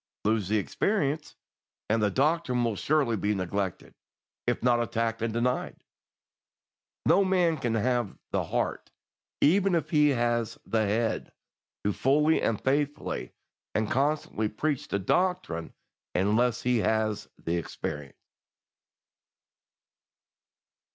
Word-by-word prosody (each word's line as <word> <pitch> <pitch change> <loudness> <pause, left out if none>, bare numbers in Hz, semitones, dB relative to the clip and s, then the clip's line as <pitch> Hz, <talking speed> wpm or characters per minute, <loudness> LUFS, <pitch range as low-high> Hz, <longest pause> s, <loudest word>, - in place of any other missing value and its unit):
Lose 110 -3 +2
the 110 - +3
experience, 150 - -1 0.5
and 110 +1 +2
the 105 - +3
doctrine 135 - +1
will 115 -3 0
surely 140 0 +1
be 105 0 0
neglected, 95 0 -3 0.5
if - - 0
not 120 -1 +4
attacked 115 -1 -1
and 115 0 0
denied. 120 +3 -1 1.2
No 200 - +5
man 180 -3 +3
can 120 -6 -1
have 120 -1 0
the - - 0
heart, - - -2 0.5
even 190 +4 +4
if 165 - -1
he 150 -2 +5
has 120 -3 0
the 110 -2 +1
head, 110 +3 -1 0.5
to 105 - +1
fully 150 +7 +3
and 110 -2 0
faithfully 145 - -1 0.4
and 110 0 0
constantly 135 -6 0
preach 140 +6 -2
the - - -1
doctrine 175 - 0 0.4
unless 110 +5 +2
he 125 -1 +2
has 110 +1 0
the 85 +1 -2
experience. 75 -3 -5
120 Hz, 115 wpm, -28 LUFS, 105-145 Hz, 1.2 s, No